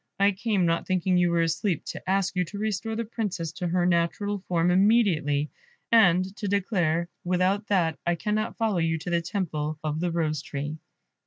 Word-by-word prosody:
I 200 Hz, +1 st, +5 dB
came, 200 Hz, -2 st, 0 dB
not 165 Hz, 0 st, 0 dB
thinking 185 Hz, 0 st, +1 dB
you 175 Hz, -1 st, +3 dB
were 170 Hz, -1 st, +2 dB
asleep, 165 Hz, +1 st, -1 dB
to -, -, -7 dB
ask 195 Hz, 0 st, +1 dB
you 180 Hz, -, +2 dB
to 200 Hz, -, -8 dB
restore 220 Hz, +1 st, -2 dB
the 230 Hz, +1 st, -2 dB
Princess 205 Hz, -7 st, -3 dB
to 180 Hz, -, -4 dB
her 175 Hz, +1 st, +1 dB
natural 180 Hz, +4 st, 0 dB
form 175 Hz, 0 st, +2 dB
immediately, 180 Hz, -8 st, +3 dB, 0.4 s
and 185 Hz, -6 st, +5 dB
to 205 Hz, -, -3 dB
declare, 180 Hz, -4 st, 0 dB, 0.2 s
without 185 Hz, +3 st, +1 dB
that, 170 Hz, -6 st, +1 dB
I 175 Hz, -, +1 dB
cannot 215 Hz, +5 st, -2 dB
follow 220 Hz, -5 st, +1 dB
you 165 Hz, 0 st, +1 dB
to 175 Hz, +3 st, -6 dB
the 170 Hz, 0 st, +2 dB
temple 160 Hz, -5 st, -3 dB
of 155 Hz, 0 st, -2 dB
the 175 Hz, +1 st, 0 dB
rose 155 Hz, -3 st, -1 dB
tree." 145 Hz, +1 st, -5 dB
180 Hz, 185 wpm, -26 LUFS, 165-200 Hz, 0.4 s, I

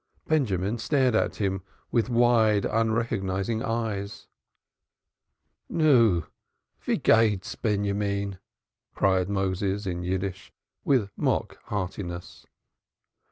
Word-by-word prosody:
Benjamin 115 Hz, -, 0 dB
stared 130 Hz, -3 st, +2 dB
at 110 Hz, -, +1 dB
him 95 Hz, -2 st, -1 dB, 0.3 s
with 115 Hz, 0 st, +1 dB
wide, 115 Hz, -3 st, +3 dB
unrecognizing 110 Hz, -2 st, 0 dB
eyes. 110 Hz, -3 st, -3 dB, 1.4 s
"Nu, 120 Hz, -, +4 dB, 0.6 s
how -, -, 0 dB
goes 115 Hz, -1 st, +4 dB
it, 100 Hz, -1 st, -6 dB
Benjamin?" 100 Hz, -2 st, -1 dB, 0.6 s
cried 95 Hz, -1 st, +2 dB
Moses 95 Hz, +1 st, -1 dB
in 90 Hz, -2 st, -3 dB
Yiddish, 95 Hz, 0 st, -3 dB, 0.3 s
with 120 Hz, -8 st, +2 dB
mock -, -, -1 dB
heartiness. 90 Hz, -3 st, -5 dB
100 Hz, 90 wpm, -26 LUFS, 95-115 Hz, 1.4 s, Nu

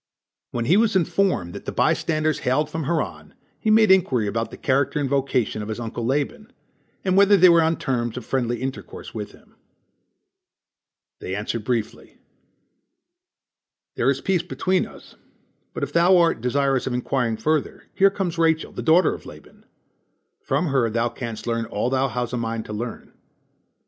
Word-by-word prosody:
When 120 Hz, -1 st, -3 dB
he 175 Hz, +10 st, +4 dB
was 220 Hz, -2 st, +2 dB
informed 180 Hz, -, +1 dB
that -, -, -9 dB
the -, -, -3 dB
by -, -, +2 dB
standers 155 Hz, -1 st, -1 dB
hailed 130 Hz, +4 st, 0 dB
from 160 Hz, -2 st, -3 dB
Haran, 160 Hz, +1 st, -3 dB, 0.2 s
he 220 Hz, -, -1 dB
made 215 Hz, -2 st, +5 dB
inquiry 135 Hz, -, +3 dB
about 115 Hz, +3 st, -2 dB
the -, -, -10 dB
character 140 Hz, +3 st, 0 dB
and 145 Hz, -, 0 dB
vocation 130 Hz, -5 st, 0 dB
of 105 Hz, -, -6 dB
his 110 Hz, +1 st, -4 dB
uncle 120 Hz, 0 st, -5 dB
Laban, 150 Hz, -, -2 dB, 0.5 s
and 185 Hz, -1 st, +2 dB
whether 200 Hz, +1 st, +6 dB
they 185 Hz, 0 st, +7 dB
were 170 Hz, -1 st, +6 dB
on 160 Hz, +1 st, +1 dB
terms 120 Hz, -4 st, -2 dB
of 125 Hz, -, -6 dB
friendly 120 Hz, -2 st, -1 dB
intercourse 135 Hz, 0 st, -7 dB
with -, -, -6 dB
him. -, -, -21 dB, 1.7 s
They 95 Hz, -, -4 dB
answered 105 Hz, +2 st, -3 dB
briefly: 115 Hz, -2 st, -3 dB, 1.8 s
"There -, -, +1 dB
is 135 Hz, 0 st, 0 dB
peace 190 Hz, -3 st, +1 dB
between 185 Hz, +1 st, -1 dB
us, -, -, -15 dB, 0.6 s
but -, -, -5 dB
if -, -, -4 dB
thou 175 Hz, +2 st, +5 dB
art 170 Hz, -8 st, +2 dB
desirous 135 Hz, +1 st, +1 dB
of 130 Hz, -, -2 dB
inquiring 125 Hz, -2 st, -1 dB
further, 155 Hz, +2 st, -1 dB
here 195 Hz, +1 st, +5 dB
comes 180 Hz, -4 st, -3 dB
Rachel 160 Hz, -1 st, +2 dB
the -, -, -6 dB
daughter 165 Hz, +3 st, +4 dB
of -, -, -10 dB
Laban. -, -, -15 dB, 0.8 s
From 175 Hz, -, 0 dB
her 130 Hz, -4 st, +2 dB
thou 115 Hz, +2 st, 0 dB
canst 115 Hz, -2 st, -7 dB
learn 115 Hz, -1 st, -1 dB
all 115 Hz, +2 st, -2 dB
thou 135 Hz, 0 st, +2 dB
hast 125 Hz, -1 st, -3 dB
a -, -, -1 dB
mind 115 Hz, -1 st, -3 dB
to 105 Hz, -, -7 dB
learn." 115 Hz, +2 st, -6 dB
135 Hz, 175 wpm, -23 LUFS, 120-170 Hz, 1.8 s, they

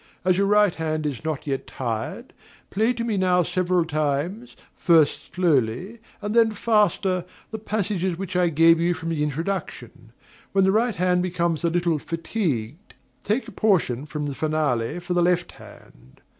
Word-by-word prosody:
As 185 Hz, -1 st, +4 dB
your 200 Hz, +2 st, +2 dB
right 210 Hz, -2 st, +4 dB
hand 155 Hz, -1 st, -3 dB
is 145 Hz, -3 st, -3 dB
not 155 Hz, -3 st, -3 dB
yet 135 Hz, -2 st, -3 dB
tired, 115 Hz, -4 st, -5 dB, 0.4 s
play 220 Hz, +4 st, +2 dB
to 235 Hz, -1 st, -3 dB
me 225 Hz, -3 st, -1 dB
now 180 Hz, -1 st, +3 dB
several 180 Hz, 0 st, 0 dB
times, 155 Hz, -, -2 dB, 0.2 s
first 155 Hz, -4 st, +2 dB
slowly 170 Hz, -, 0 dB, 0.2 s
and 210 Hz, +1 st, -2 dB
then 225 Hz, -1 st, +4 dB
faster, 205 Hz, -5 st, +1 dB, 0.3 s
the 220 Hz, -, -5 dB
passages 200 Hz, -4 st, -2 dB
which 185 Hz, -1 st, -6 dB
I 180 Hz, -1 st, +3 dB
gave 165 Hz, +1 st, +5 dB
you 175 Hz, +1 st, +1 dB
from 165 Hz, +1 st, -5 dB
the 160 Hz, -3 st, -2 dB
introduction. 165 Hz, +7 st, -4 dB, 0.4 s
When 195 Hz, 0 st, +4 dB
the 190 Hz, -, +4 dB
right 225 Hz, +1 st, +1 dB
hand 180 Hz, 0 st, +2 dB
becomes 170 Hz, -2 st, -1 dB
a 170 Hz, -, +2 dB
little 170 Hz, -2 st, 0 dB
fatigued, 165 Hz, -, -3 dB, 0.3 s
take 220 Hz, +6 st, -1 dB
a -, -, -9 dB
portion 155 Hz, -, +1 dB
from 150 Hz, -1 st, -4 dB
the 145 Hz, -, -3 dB
finale 150 Hz, -3 st, -1 dB
for 175 Hz, +1 st, -4 dB
the 175 Hz, -, +2 dB
left 175 Hz, 0 st, +1 dB
hand. 65 Hz, +2 st, -17 dB
175 Hz, 170 wpm, -24 LUFS, 155-195 Hz, 0.4 s, gave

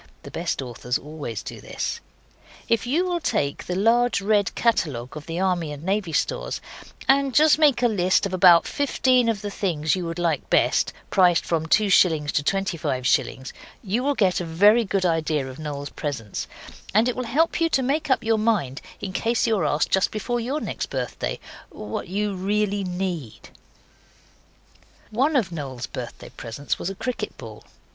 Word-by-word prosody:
(The -, -, -10 dB
best -, -, -2 dB
authors 125 Hz, 0 st, -3 dB
always 145 Hz, -7 st, -6 dB
do -, -, -8 dB
this.) -, -, -4 dB, 0.7 s
If 230 Hz, 0 st, +1 dB
you 325 Hz, +9 st, +1 dB
will 355 Hz, -1 st, -1 dB
take 140 Hz, -, -1 dB
the 180 Hz, -, -2 dB
large, 230 Hz, +4 st, +3 dB
red 205 Hz, 0 st, +1 dB
catalogue 145 Hz, -, 0 dB
of 150 Hz, -1 st, -8 dB
the 165 Hz, +1 st, -3 dB
Army 180 Hz, -5 st, 0 dB
and 145 Hz, +1 st, -8 dB
Navy 190 Hz, -1 st, -1 dB
Stores, -, -, -1 dB, 0.5 s
and 275 Hz, -1 st, +3 dB
just 310 Hz, 0 st, +5 dB
make 285 Hz, -5 st, +4 dB
a -, -, +6 dB
list 190 Hz, -3 st, +2 dB
of 195 Hz, -, -4 dB
about 180 Hz, -2 st, +6 dB
fifteen 255 Hz, -4 st, +2 dB
of 210 Hz, -3 st, -2 dB
the 205 Hz, -, -4 dB
things 160 Hz, -6 st, 0 dB
you 180 Hz, -2 st, -3 dB
would 165 Hz, +1 st, -5 dB
like 165 Hz, -5 st, -1 dB
best -, -, +3 dB, 0.2 s
prices 180 Hz, -3 st, +4 dB
from 160 Hz, -1 st, -1 dB
2s. 175 Hz, -7 st, +3 dB
to 145 Hz, -, 0 dB
25s. 145 Hz, -8 st, 0 dB, 0.3 s
you 215 Hz, +4 st, -1 dB
will 285 Hz, +2 st, 0 dB
get 190 Hz, -6 st, +2 dB
a -, -, -2 dB
very 205 Hz, +8 st, +4 dB
good 190 Hz, -1 st, 0 dB
idea 155 Hz, -4 st, 0 dB
of 130 Hz, +2 st, -9 dB
Noel's 145 Hz, -2 st, -5 dB
presents, 120 Hz, -9 st, -4 dB, 0.5 s
and 220 Hz, +3 st, +5 dB
it 250 Hz, -, 0 dB
will 255 Hz, -, -3 dB
help 310 Hz, +9 st, +1 dB
you 330 Hz, -, +3 dB
to 265 Hz, -, +1 dB
make 295 Hz, +4 st, -1 dB
up 260 Hz, -, +2 dB
your 225 Hz, 0 st, +2 dB
mind 200 Hz, -, 0 dB, 0.2 s
in 190 Hz, -, -5 dB
case 230 Hz, +4 st, +1 dB
you 225 Hz, -2 st, +2 dB
are 160 Hz, -, 0 dB
asked 150 Hz, +1 st, +1 dB
just 190 Hz, -, +3 dB
before 240 Hz, +3 st, -2 dB
your 260 Hz, +6 st, -2 dB
next -, -, -4 dB
birthday -, -, -3 dB, 0.3 s
what -, -, -6 dB
you 205 Hz, +3 st, -1 dB
really 200 Hz, +1 st, 0 dB
NEED. 180 Hz, -, -4 dB, 1.6 s
One 275 Hz, +8 st, +1 dB
of 220 Hz, -10 st, +1 dB
Noel's 135 Hz, -7 st, -5 dB
birthday 120 Hz, -2 st, -8 dB
presents 125 Hz, +3 st, -5 dB
was 175 Hz, -, -3 dB
a 195 Hz, -, -6 dB
cricket 250 Hz, +5 st, -4 dB
ball. -, -, -10 dB
190 Hz, 180 wpm, -24 LUFS, 155-230 Hz, 1.6 s, a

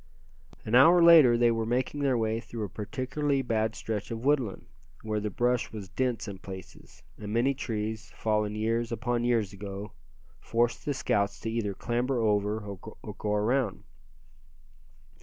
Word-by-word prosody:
An 110 Hz, -, -4 dB
hour 165 Hz, +8 st, +7 dB
later 155 Hz, -8 st, +8 dB
they 120 Hz, 0 st, +4 dB
were 115 Hz, -1 st, 0 dB
making 125 Hz, +5 st, -1 dB
their 135 Hz, -3 st, +2 dB
way 110 Hz, 0 st, 0 dB
through 115 Hz, -1 st, -6 dB
a 100 Hz, -, -4 dB
particularly 135 Hz, +6 st, -2 dB
bad 110 Hz, -2 st, 0 dB
stretch 105 Hz, -2 st, -4 dB
of 115 Hz, +2 st, -5 dB
woodland, 135 Hz, -9 st, +1 dB, 0.4 s
where 110 Hz, -1 st, -1 dB
the 105 Hz, 0 st, -2 dB
brush 120 Hz, +4 st, 0 dB
was 105 Hz, -4 st, -8 dB
dense 125 Hz, -1 st, -1 dB
in 100 Hz, -2 st, -7 dB
places, 95 Hz, -1 st, -11 dB, 0.2 s
and 105 Hz, -1 st, -6 dB
many 120 Hz, +5 st, +2 dB
trees, 110 Hz, -3 st, -4 dB
fallen 105 Hz, -1 st, 0 dB
years 115 Hz, +2 st, -1 dB
upon 120 Hz, +1 st, -1 dB
years 115 Hz, -5 st, +1 dB
ago, 100 Hz, +1 st, -7 dB, 0.5 s
forced 120 Hz, +8 st, 0 dB
the 145 Hz, -, -1 dB
scouts 100 Hz, -5 st, 0 dB
to 115 Hz, -, -3 dB
either 105 Hz, -4 st, -2 dB
clamber 120 Hz, +4 st, -1 dB
over, 105 Hz, -1 st, +1 dB
or 100 Hz, -1 st, -7 dB, 0.4 s
go 105 Hz, -, -3 dB
around. 110 Hz, +1 st, 0 dB
115 Hz, 160 wpm, -28 LUFS, 105-125 Hz, 0.5 s, later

